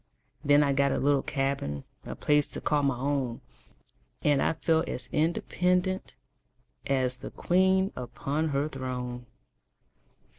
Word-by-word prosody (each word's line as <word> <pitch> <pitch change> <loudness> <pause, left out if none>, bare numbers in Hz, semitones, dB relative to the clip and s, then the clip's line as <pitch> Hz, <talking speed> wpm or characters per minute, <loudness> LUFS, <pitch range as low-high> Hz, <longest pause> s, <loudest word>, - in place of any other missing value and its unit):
Then 145 +1 +5
I 140 -1 +2
got 140 0 +2
a - - 0
little 140 0 +3
cabin 135 - -2 0.2
A - - -5
place 150 -1 +2
to - - -4
call 150 -1 +1
my 135 -3 +1
own 135 -3 -1 0.8
And 145 -2 +3
I - - +2
felt 160 0 +1
as 125 0 -5
independent 180 +3 0 0.7
As 130 -2 +1
the - - -7
queen 190 +2 +2
upon 135 +5 -2
her 140 0 0
throne. 125 -3 -5
140 Hz, 135 wpm, -28 LUFS, 130-155 Hz, 0.8 s, Then